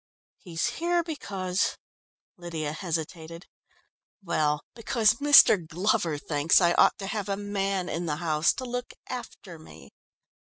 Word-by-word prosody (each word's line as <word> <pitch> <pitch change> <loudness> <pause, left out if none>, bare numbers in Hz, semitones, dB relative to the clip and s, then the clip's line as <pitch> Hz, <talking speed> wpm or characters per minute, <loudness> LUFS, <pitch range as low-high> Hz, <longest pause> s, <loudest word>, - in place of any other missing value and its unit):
"He's 170 -2 -3
here 340 +8 0
because 195 - -2 0.3
" - - -72
Lydia 160 -4 -4
hesitated, 165 0 -5 0.8
"well, 150 -4 0
because 225 -1 +2
Mr. 285 -10 +7
Glover 170 0 0
thinks 145 +2 +2
I 175 -2 +3
ought - - +4
to 195 - -6
have 205 0 -4
a 195 - -1
man 195 -2 -2
in 170 +1 -3
the 150 - -1
house 155 -1 +1
to 260 - -6
look 245 0 -5
after 220 -8 -8
me." 70 - -15
180 Hz, 135 wpm, -27 LUFS, 160-215 Hz, 0.8 s, Mr